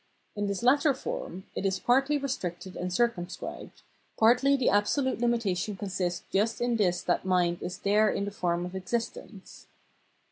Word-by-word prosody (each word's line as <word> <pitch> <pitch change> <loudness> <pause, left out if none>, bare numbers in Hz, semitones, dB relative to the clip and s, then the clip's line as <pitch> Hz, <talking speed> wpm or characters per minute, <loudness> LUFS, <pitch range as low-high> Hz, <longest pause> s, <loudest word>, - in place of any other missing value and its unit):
In 205 0 -1
this 200 +3 -3
latter 280 +3 +4
form - - -5
it - - -4
is 195 -1 +1
partly 270 +4 +3
restricted 185 -10 -4
and 180 0 -3
circumscribed, 190 -3 -3 0.3
partly 250 +5 +5
the 260 - 0
absolute 240 +7 +2
limita 230 -5 +1
tion 200 +3 -3
consists 185 -3 -3
just 215 +4 +1
in 240 -1 +1
this 180 -4 +1
that - - 0
mind 180 -2 +1
is 180 - -5
there 210 +2 +3
in 200 - -1
the 205 - -4
form 175 -3 -1
of 180 - -7
existence. 200 0 -5
205 Hz, 165 wpm, -28 LUFS, 185-240 Hz, 0.3 s, partly